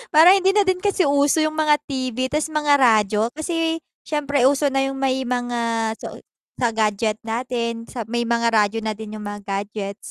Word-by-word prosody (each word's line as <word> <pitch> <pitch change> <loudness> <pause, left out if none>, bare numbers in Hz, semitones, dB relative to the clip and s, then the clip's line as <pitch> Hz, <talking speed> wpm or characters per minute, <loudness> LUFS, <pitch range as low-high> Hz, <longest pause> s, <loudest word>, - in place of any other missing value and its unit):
parang 330 +4 +8
hindi 385 +2 +2
na 410 - +5
din 375 -1 0
kasi 400 -1 +1
uso 285 +2 +2
yung 310 0 -1
mga 300 -1 +4
TV, 260 -2 -3
'tas 300 +1 0
mga 295 -2 +2
radyo, 215 -3 +3
kasi 325 0 -2 0.2
s'yempre, 285 -4 +1
uso 280 0 +2
na 270 - +1
yung 270 - -4
may 265 -1 -1
mga 235 -2 -1
soy - - -9 0.3
sa 240 -2 0
gadget 215 0 0
natin 235 0 -3
sa 235 -4 -5
may 235 +1 -1
mga 235 0 +1
radyo 210 +1 +2
na 220 - -1
din 215 0 -8
yung 210 - -8
mga 205 0 -6 0.2
gadgets. 200 -1 -6
255 Hz, 190 wpm, -21 LUFS, 225-295 Hz, 0.3 s, parang